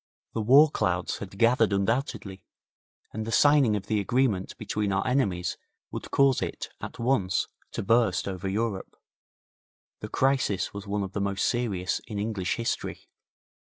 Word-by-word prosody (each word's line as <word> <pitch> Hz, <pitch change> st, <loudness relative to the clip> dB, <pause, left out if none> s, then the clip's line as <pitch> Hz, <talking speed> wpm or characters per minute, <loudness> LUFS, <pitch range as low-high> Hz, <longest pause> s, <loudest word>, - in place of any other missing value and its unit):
The 115 Hz, -, -1 dB
war 140 Hz, +7 st, +6 dB
clouds 90 Hz, -7 st, -1 dB
had 100 Hz, -1 st, -8 dB
gathered 115 Hz, 0 st, +4 dB
undoubtedly, 100 Hz, -2 st, -1 dB, 0.7 s
and 110 Hz, -, -3 dB
the 115 Hz, -, -5 dB
signing 145 Hz, -5 st, +5 dB
of 100 Hz, -, -4 dB
the 110 Hz, -, 0 dB
agreement 105 Hz, -3 st, 0 dB
between 105 Hz, -2 st, -2 dB
our 95 Hz, 0 st, 0 dB
enemies 100 Hz, -10 st, 0 dB, 0.3 s
would -, -, -6 dB
cause 135 Hz, -2 st, +3 dB
it -, -, -4 dB
at -, -, -7 dB
once 115 Hz, -8 st, +1 dB, 0.3 s
to -, -, -3 dB
burst 115 Hz, -3 st, +2 dB
over 95 Hz, 0 st, -3 dB
Europe. 105 Hz, -1 st, -2 dB, 1.0 s
The -, -, -7 dB
crisis 130 Hz, -8 st, +1 dB
was 100 Hz, 0 st, -7 dB
one 100 Hz, 0 st, -1 dB
of 95 Hz, -, -5 dB
the 100 Hz, -, -2 dB
most 100 Hz, -1 st, 0 dB
serious 105 Hz, -7 st, -1 dB
in 105 Hz, -, -5 dB
English 100 Hz, -3 st, -1 dB
history. 115 Hz, -1 st, -4 dB
105 Hz, 155 wpm, -27 LUFS, 95-120 Hz, 1.0 s, war